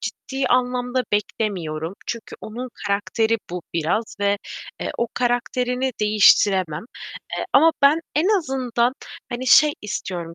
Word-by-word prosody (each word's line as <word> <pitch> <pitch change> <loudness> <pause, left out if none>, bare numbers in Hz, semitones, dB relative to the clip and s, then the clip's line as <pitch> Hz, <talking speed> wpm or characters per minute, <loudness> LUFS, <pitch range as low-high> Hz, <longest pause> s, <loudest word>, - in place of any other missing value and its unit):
ciddi 270 0 -4
anlamda 250 0 +1
beklemiyorum. 180 -6 -2
Çünkü 230 -1 -6
onun 245 +4 -6 0.2
karakteri 220 +3 +1
bu 180 -1 -5
biraz 170 +8 -1
ve, 200 0 +2 0.4
eee, - - -2
o 235 - +1
karakterini 250 +1 0
değiştiremem. 200 -5 +4 0.5
Eee, - - -2
ama 325 0 +6
ben 290 +4 +6
en 325 +7 +2
azından, 255 -5 0 0.4
hani, 250 +1 -4
şey 300 +3 +7
istiyorum 180 -5 -5
235 Hz, 120 wpm, -22 LUFS, 200-255 Hz, 0.5 s, şey